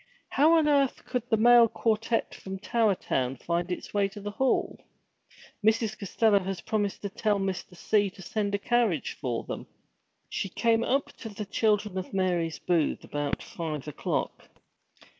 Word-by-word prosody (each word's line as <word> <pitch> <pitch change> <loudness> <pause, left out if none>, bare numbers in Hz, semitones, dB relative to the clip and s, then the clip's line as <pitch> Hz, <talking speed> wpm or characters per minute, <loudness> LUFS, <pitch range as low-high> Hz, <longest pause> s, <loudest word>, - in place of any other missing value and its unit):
How 305 +4 +4
on 310 -2 +3
earth 280 -3 +2
could 250 -1 -3
the 220 - +3
Male 240 +1 +7
Quartette 225 +1 0
from 190 0 -7
Tower 215 0 +2
Town 130 -6 -1
find 170 +6 -2
its 180 - -5
way 200 -1 +2
to 200 +1 -10
the 205 +1 -5
hall? 265 +5 0 0.8
Mrs. 220 0 +2
Costello 205 +1 +2
had 190 -1 -5
promised 210 -2 -1
to 200 - -2
tell 210 +1 0
Mr. 190 -2 -3
C. 205 +1 +2
to 190 - -14
send 205 +1 -1
a - - +1
carriage 225 -5 +1
for 120 -5 -2
them. - - -6 0.6
She 195 - -3
came 230 +4 +2
up 275 +3 0
to 225 - -7
the 210 0 -6
Children 210 -2 +1
of 185 - -7
Mary's 175 -4 0
booth 170 -4 0
about 145 -1 -3
five 155 -4 -5
o'clock. 150 - -3
205 Hz, 165 wpm, -28 LUFS, 185-225 Hz, 0.8 s, Male